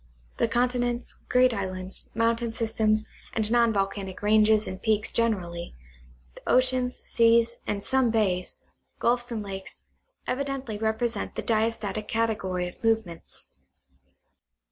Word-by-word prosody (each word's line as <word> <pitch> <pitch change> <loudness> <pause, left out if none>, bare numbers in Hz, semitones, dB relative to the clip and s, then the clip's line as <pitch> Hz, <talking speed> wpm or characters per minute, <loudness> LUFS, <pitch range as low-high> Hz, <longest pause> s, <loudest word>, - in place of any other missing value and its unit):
The - - +2
continents, 245 0 -1
great 250 0 +4
islands, 185 -2 -4
mountain 230 0 +1
systems, 220 -1 +1 0.3
and 220 -1 0
non 235 -1 +4
volcanic 195 -1 -2
ranges 215 0 +4
and 185 - -6
peaks 215 -2 +1
generally, 180 - -1 0.6
the - - -14
oceans, 255 0 +2
seas, 230 0 +3
and 200 -1 -2
some 260 -2 +3
bays, 195 -5 0 0.4
gulfs 240 0 +1
and 220 -2 -3
lakes, 195 -1 -7 0.4
evidently 270 -5 -3
represent 220 0 -1
the - - -3
diastatic 215 -2 0
category 200 -5 -1
of 175 - -12
move 225 -1 +3
ments. 170 -1 -11
220 Hz, 120 wpm, -27 LUFS, 200-235 Hz, 0.6 s, great